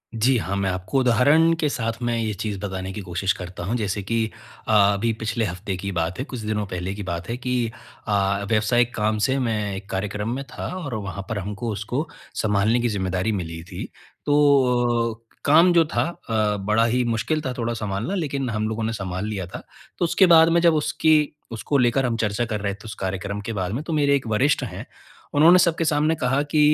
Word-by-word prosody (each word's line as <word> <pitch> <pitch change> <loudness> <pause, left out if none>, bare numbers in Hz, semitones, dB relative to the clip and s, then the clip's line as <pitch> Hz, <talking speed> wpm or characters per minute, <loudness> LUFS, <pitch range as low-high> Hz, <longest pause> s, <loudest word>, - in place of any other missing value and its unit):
जी 125 +4 +3
हाँ, 95 0 -2
मैं 100 -1 0
आपको 95 +9 -1
उदाहरण 145 +7 +4
के 155 - +2
साथ 115 -3 -3
मैं 120 -1 0
ये 110 -2 -1
चीज़ 105 +1 -4
बताने 95 -1 -4
की 105 - -5
कोशिश 90 +1 -1
करता 90 -1 -7
हूँ। 115 - -1
जैसे 100 -2 -2
कि 115 +2 0 0.4
अ, 110 - +1 0.2
अभी 115 +3 0
पिछले 110 0 -1
हफ़्ते 95 +1 -4
की 100 - -6
ही - - -1
बात 85 +2 -2
है, 130 - -2
कुछ 130 -5 -7
दिनों 105 -1 -2
पहले 90 +1 -4
की 100 0 -6
बात 85 -1 -5
है 120 - -2
कि 125 -1 -1 0.4
अ, 100 -1 +1
व्यावसायिक 115 +2 +2
काम 110 0 +1
से 135 0 +1
मैं 105 -5 -1
एक 100 +1 -9
कार्यक्रम 105 +2 -3
में 140 - -4
था - - -6 0.2
और 130 -5 -4
वहाँ 100 -2 -5
पर 110 - -2
हमको 105 +4 -4
उसको 120 - -3 0.3
सँभालने 105 +2 +2
की 120 - +1
ज़िम्मेदारी 95 0 -1
मिली 85 -4 -4
थी। 90 +1 -7 0.4
तो 125 -5 +3
अ, 115 - -50 0.2
काम 165 +5 +6
जो 170 -1 +5
था - - +3 0.3
अ, 105 -2 +1
बड़ा 105 +3 +2
ही 125 +2 +1
मुश्किल 120 +7 -1
था 130 - -1
थोड़ा 120 -1 -1
सँभालना, 110 - -3
लेकिन 140 -7 -2
हम 110 -1 -1
लोगों 110 0 -3
ने 115 +1 -1
सँभाल 95 -1 -4
लिया 100 -4 -3
था। 90 - -8 0.3
तो 175 - +1
उसके 190 +3 +4
बाद 160 0 +7
में 170 0 +3
जब 170 -1 +5
उसकी 150 0 +2 0.2
उसको 115 +5 -1
लेकर 125 +1 +2
हम 115 -2 0
चर्चा 110 +1 0
कर 110 -3 -3
रहे 100 -1 -1
थे 100 +3 -13
उस 110 - -6
कार्यक्रम 95 +2 -3
के 115 - -3
बारे 95 -2 -2
में 135 +6 -3
तो 160 - -4
मेरे 140 -2 +3
एक 130 -4 -2
वरिष्ठ 130 +7 +2
हैं, - - -6 0.5
उन्होंने 165 +5 +7
सबके 170 -2 +2
सामने 155 +1 +2
कहा 135 +1 +1
कि 155 - +2
110 Hz, 220 wpm, -23 LUFS, 100-130 Hz, 0.5 s, बाद